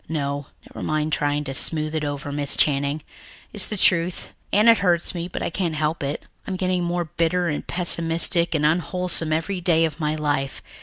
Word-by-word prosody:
No, 145 -2 -2 0.2
never - - -8
mind 155 0 -1
trying 145 -1 0
to 135 - -5
smooth 155 +2 0
it 155 -1 -1
over, 145 -1 -4
Miss 145 -1 +2
Channing. 145 +1 +1 0.5
It's 205 -3 +5
the 210 - -3
truth, 175 -1 +1 0.2
and 210 +3 +4
it 230 -2 +7
hurts 175 -3 +1
me, 175 -1 -4
but 180 - -5
I - - -2
can't 170 -3 -1
help 155 +1 -1
it. 140 +1 -3 0.2
I'm 190 - -2
getting 185 -1 0
more 175 0 -1
bitter 170 +3 0
and 150 -2 -3
pessimistic 170 -1 +2
and 150 -1 +1
unwholesome 170 0 0
every 170 +4 -1
day 165 -2 +3
of 160 0 -5
my 155 -1 0
life. 145 -3 -2
160 Hz, 195 wpm, -23 LUFS, 150-175 Hz, 0.5 s, it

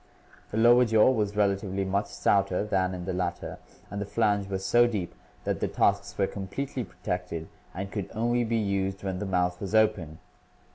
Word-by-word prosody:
The 105 - -4
lower 120 +2 +6
jaw 110 +1 +5
was 105 -4 -1
relatively 100 -1 0
much 100 +2 0
stouter 100 -1 +1
than 95 -3 0
in 90 -1 -6
the 95 - -2
latter 90 -1 -3 0.3
and 100 0 -3
the - - -2
flange 105 -3 +1
was 95 -1 -3
so 120 0 +5
deep 100 -7 -3 0.3
that - - -1
the - - 0
tusks 100 0 +1
were 100 - +3
completely 125 +8 -4
protected 90 -3 -4 0.3
and 95 +2 -5
could 100 -4 -4
only 120 +2 +1
be 115 0 0
used 100 -2 -1
when 95 -2 -2
the 105 - -3
mouth 90 -1 0
was 100 +2 -3
open. 105 -8 +2
100 Hz, 185 wpm, -28 LUFS, 95-110 Hz, 0.3 s, lower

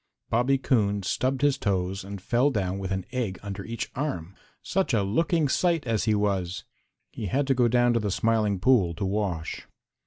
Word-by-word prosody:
Bobby 125 +4 +3
Coon 105 -7 +1
stubbed 130 +7 -1
his 145 -2 +3
toes 95 -1 -1
and 100 0 -7
fell 120 +8 +2
down 95 -6 -2
with 95 -1 -4
an 95 -1 -2
egg 120 -7 -2
under 100 -1 -5
each 115 +2 -5
arm. 110 - -3 0.3
Such 190 -9 0
a 105 - +2
looking 155 - +1
sight 165 +1 +1
as 115 -3 0
he 110 -2 +3
was! 95 -3 -1 0.5
He 105 - -5
had 135 +8 +1
to 135 - +2
go 125 -2 +3
down 120 0 +3
to 115 - +2
the 105 -2 -2
Smiling 105 -1 +1
Pool 95 -7 +3
to 95 - -3
wash. 95 -5 -2
110 Hz, 190 wpm, -26 LUFS, 95-130 Hz, 0.5 s, Bobby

